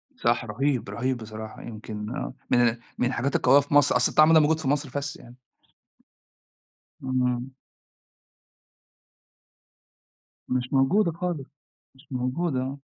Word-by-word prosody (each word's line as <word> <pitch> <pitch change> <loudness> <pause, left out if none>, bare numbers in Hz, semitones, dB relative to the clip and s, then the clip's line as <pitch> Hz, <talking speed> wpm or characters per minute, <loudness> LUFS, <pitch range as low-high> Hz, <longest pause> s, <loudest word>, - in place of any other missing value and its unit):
صح، - - +1
رهيب، 135 -6 -1
رهيب 125 +5 -1
بصراحة 110 -1 -8
يمكن 110 -1 -8 0.5
من 120 - +5
ال 115 +1 -6 0.2
من 125 - +1
الحاجات 130 +2 -1
القوية 135 +3 +5
في 145 +1 -4
مصر، 145 -2 +5
أصل 125 - +3
الطعم 155 +1 +6
ده 160 - +8
موجود 155 +1 +2
في 155 - -4
مصر 145 0 0
بس 145 +1 -3
يعني. 120 +1 -15 1.7
امم. 125 0 -1 3.0
مش 125 +1 -2
موجودة 170 +8 +3
خالص، 170 -4 -4 0.5
مش 135 +3 -21
موجودة، 130 +3 -1
آه. 135 +2 -5
130 Hz, 125 wpm, -26 LUFS, 125-145 Hz, 3.0 s, ده